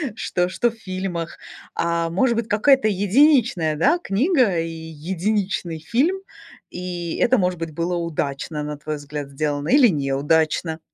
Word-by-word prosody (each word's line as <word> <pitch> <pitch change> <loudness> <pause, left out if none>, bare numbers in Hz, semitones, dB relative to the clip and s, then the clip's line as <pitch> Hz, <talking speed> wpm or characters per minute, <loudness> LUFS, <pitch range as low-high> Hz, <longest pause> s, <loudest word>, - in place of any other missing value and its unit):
что 180 -4 -1
что 235 +6 0
в - - -16
фильмах. 185 -5 -5 0.4
А, 170 0 0
может 235 +8 +2
быть, 230 - -1
какая-то 235 +3 +4
единичная, 205 - +3
да, 275 - +3
книга 240 - +2
и 165 0 -2
единичный 170 +3 -3
фильм, 265 - 0 0.5
и 175 -2 -5
это, 255 +1 +3
может 180 -3 0
быть, 165 -1 -4
было 170 +3 -1
удачно, 150 -2 -3
на 150 0 -5
твой 150 +1 -4
взгляд, 145 0 -6
сделано 145 +1 -2
или 275 -4 +6
неудачно. 155 +2 0
175 Hz, 145 wpm, -22 LUFS, 160-215 Hz, 0.5 s, или